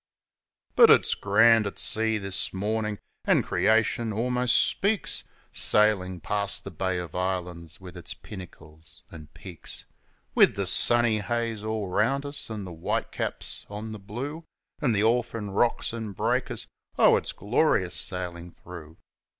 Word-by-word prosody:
But - - +8
it's - - +5
grand 110 +2 +4
at 100 - -7
sea 110 0 +2
this 100 -2 -2
mornin', 105 +2 -2 0.3
an' - - +3
Creation 115 +1 +1
almost 125 +3 +1
speaks, 200 0 +1 0.3
Sailin' 95 -4 +3
past 100 +2 -2
the - - -8
Bay 95 -1 -2
of 90 -3 -6
Islands 90 -3 -3
with 90 -1 -11
its 85 -4 -5
pinnacles 80 -5 -8
an' 75 -2 -11
peaks, 90 -6 -8 0.5
With - - +5
the - - -1
sunny 120 -2 +6
haze 115 0 -3
all 110 -2 -3
round 125 +10 0
us 145 -3 -6
an' 110 -2 -5
the 90 - -8
white 80 +1 -3
caps - - -5
on 105 +2 -7
the 110 - -7
blue. 130 +11 -6 0.4
An' 130 -6 +2
the 105 0 +1
orphan 115 -2 0
rocks 115 +3 0
an' 110 -3 -5
breakers - - -2 0.3
oh, - - +6
it's - - -2
glorious - - 0
sailin' 90 -1 -2
through 85 -2 -12
105 Hz, 145 wpm, -26 LUFS, 90-115 Hz, 0.5 s, But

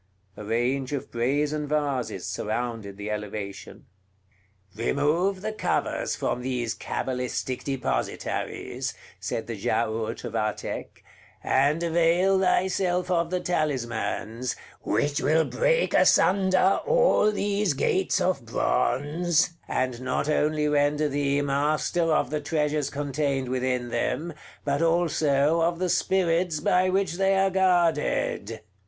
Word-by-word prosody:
A 105 - -8
range 125 +5 -1
of 140 - -4
brazen 145 +5 0
vases 140 -10 -1
surrounded 110 -3 -3
the 105 +1 -5
elevation. 105 -1 -6 0.9
"Remove 160 - 0
the 215 0 -2
covers - - -1
from 125 - -2
these 125 -2 -2
cabalistic 125 0 -3
depositaries," 135 - -3 0.2
said - - -3
the - - -5
Giaour 110 0 -1
to 120 - -6
Vathek, 110 -1 -4 0.4
"and 145 +5 +2
avail 170 +3 +3
thyself 185 -1 +1
of 170 -1 +1
the 180 0 -1
talismans, 125 -7 -2 0.3
which 145 0 0
will 160 +1 +3
break - - +1
asunder 190 0 +4
all - - +4
these 205 -4 0
gates 185 +7 +1
of 180 -8 0
bronze, 155 +8 +1 0.2
and 130 -1 -1
not 130 +2 -1
only 150 0 +1
render 150 +1 +2
thee 145 0 0
master 150 +4 +1
of 155 - +1
the 150 -1 -1
treasures 150 -1 0
contained 140 -2 -2
within 125 -1 -1
them, 155 +8 -2 0.3
but 140 +1 0
also 165 -2 +2
of 170 +1 +1
the 185 +1 -1
spirits 175 -3 +1
by 185 +1 +2
which 190 -2 0
they 195 0 +3
are 195 0 +3
guarded." 170 - +1
150 Hz, 120 wpm, -26 LUFS, 130-175 Hz, 0.9 s, asunder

